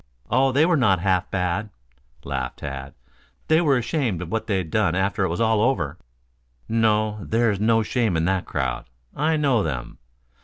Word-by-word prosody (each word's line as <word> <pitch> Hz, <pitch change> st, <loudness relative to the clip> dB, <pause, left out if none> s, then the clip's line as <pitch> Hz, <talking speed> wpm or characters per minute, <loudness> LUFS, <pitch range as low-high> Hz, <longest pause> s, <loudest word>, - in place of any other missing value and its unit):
"Oh, 130 Hz, +3 st, +3 dB
they 145 Hz, +5 st, +4 dB
were 170 Hz, -1 st, +3 dB
not 105 Hz, -8 st, +3 dB
half 90 Hz, -1 st, +1 dB
bad," 95 Hz, +3 st, -1 dB, 0.5 s
laughed -, -, -4 dB
Tad. 70 Hz, -1 st, -7 dB, 0.5 s
"They 160 Hz, +1 st, +4 dB
were 145 Hz, -6 st, +3 dB
ashamed 120 Hz, -, -1 dB
of 85 Hz, -, -9 dB
what 110 Hz, 0 st, -2 dB
they'd 95 Hz, -7 st, -1 dB
done 100 Hz, -6 st, +1 dB
after 95 Hz, +2 st, 0 dB
it 95 Hz, -, +1 dB
was 85 Hz, -, -3 dB
all 110 Hz, -2 st, +2 dB
over." 90 Hz, -, 0 dB, 0.7 s
"No. 110 Hz, -1 st, +1 dB
There's 110 Hz, -2 st, +1 dB
no 115 Hz, +1 st, +3 dB
shame 110 Hz, -5 st, 0 dB
in 80 Hz, -, 0 dB
that 95 Hz, 0 st, 0 dB
crowd. 65 Hz, -2 st, -2 dB, 0.3 s
I 155 Hz, +2 st, +1 dB
know 135 Hz, -7 st, +2 dB
them. 70 Hz, -9 st, -4 dB
105 Hz, 170 wpm, -23 LUFS, 90-120 Hz, 0.7 s, they